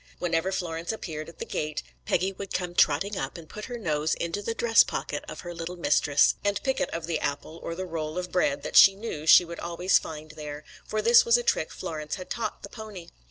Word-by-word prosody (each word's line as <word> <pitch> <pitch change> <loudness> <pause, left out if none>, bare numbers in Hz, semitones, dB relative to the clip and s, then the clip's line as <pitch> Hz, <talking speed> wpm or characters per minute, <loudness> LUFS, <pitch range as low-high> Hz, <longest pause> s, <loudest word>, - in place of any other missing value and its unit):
Whenever 175 +1 0
Florence 170 -2 -3
appeared 160 -8 -6
at 165 - -15
the - - -5
gate, 150 0 -3 0.2
Peggy 185 +3 +1
would 195 0 -8
come 180 -1 -2
trotting 175 +6 +2
up 135 +4 -4
and 165 -2 -11
put 210 +5 -8
her 245 -1 -6
nose 155 -7 0
into 170 +4 -3
the 225 +2 -3
dress 230 0 +5
pocket - - -4
of - - -7
her 175 -1 -7
little 170 +1 -5
mistress, 145 -3 +3
and 205 0 +1
pick 265 -1 0
it 275 - 0
of 165 -1 -4
the 165 -2 -1
apple 145 +3 -4
or 165 - -4
the 185 +2 -4
roll 160 -2 -4
of 180 -1 -4
bread 145 -6 +1
that - - -5
she 195 - +9
knew 195 -8 -6
she 175 - +8
would 170 0 -8
always 175 +2 +2
find 155 0 -8
there, 150 -1 -7 0.2
for 215 0 -1
this 235 +2 +7
was 235 0 +5
a 240 - -2
trick 160 - +1
Florence 155 -1 -5
had 185 - -9
taught 220 -2 -3
the 200 - -7
pony. 210 -7 -9
170 Hz, 235 wpm, -27 LUFS, 155-200 Hz, 0.2 s, she